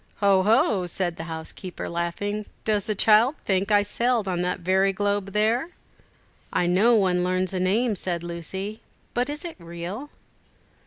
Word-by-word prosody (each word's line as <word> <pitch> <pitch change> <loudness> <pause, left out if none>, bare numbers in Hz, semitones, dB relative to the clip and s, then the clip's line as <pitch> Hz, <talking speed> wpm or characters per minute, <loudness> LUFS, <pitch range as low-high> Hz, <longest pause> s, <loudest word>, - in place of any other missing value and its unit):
"Ho! 200 -2 +4
ho!" 210 -3 +3
said 175 0 -1
the 165 - -6
housekeeper, 165 +3 -6
laughing; 200 +5 -3 0.2
"does 210 -3 +1
the 215 - -1
child 220 +7 +4
think 195 +1 +1
I 205 0 +5
sailed 235 +1 0
on 180 -2 -1
that 180 +1 -2
very 190 +2 +3
globe 200 0 -1
there?" 225 +9 +1 0.8
"I 180 - +1
know 200 +7 +4
one 185 -4 +2
learns 185 +1 0
names," 195 +3 +1
said 175 -2 -2
Lucy; 190 +5 -5 0.3
"but 245 +3 0
is 295 +4 -4
it 340 - -6
real?" 170 +10 -6
195 Hz, 155 wpm, -25 LUFS, 180-215 Hz, 0.8 s, I